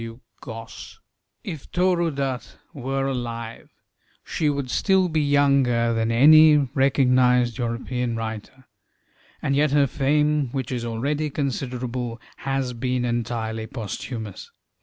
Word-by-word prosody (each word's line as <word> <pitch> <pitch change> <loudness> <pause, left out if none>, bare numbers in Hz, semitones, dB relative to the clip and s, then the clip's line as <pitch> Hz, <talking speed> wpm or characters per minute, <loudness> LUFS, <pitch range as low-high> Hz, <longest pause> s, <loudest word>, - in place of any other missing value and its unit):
If 155 -5 -7
Toru 175 -1 +2
Dutt 135 -4 -4 0.2
were 135 0 -2
alive, 115 -3 -5 0.5
she 155 - -1
would 140 -3 -2
still 190 -2 +2
be 155 -1 +1
younger 140 -5 +3
than 115 0 0
any 155 +5 +7 0.2
recognized 125 -3 +3
European 120 0 -2
writer, 115 +3 -6 0.8
and 140 - +1
yet 150 +2 +3
her 145 0 +4
fame, 150 +1 +1
which 130 -3 -3
is 125 -2 -2
already 140 +7 -2
considerable, 125 -4 -3 0.2
has 135 -2 -2
been 125 +1 -1
entirely 115 -2 -2
posthumous. 110 -2 -6
130 Hz, 110 wpm, -23 LUFS, 120-145 Hz, 0.8 s, any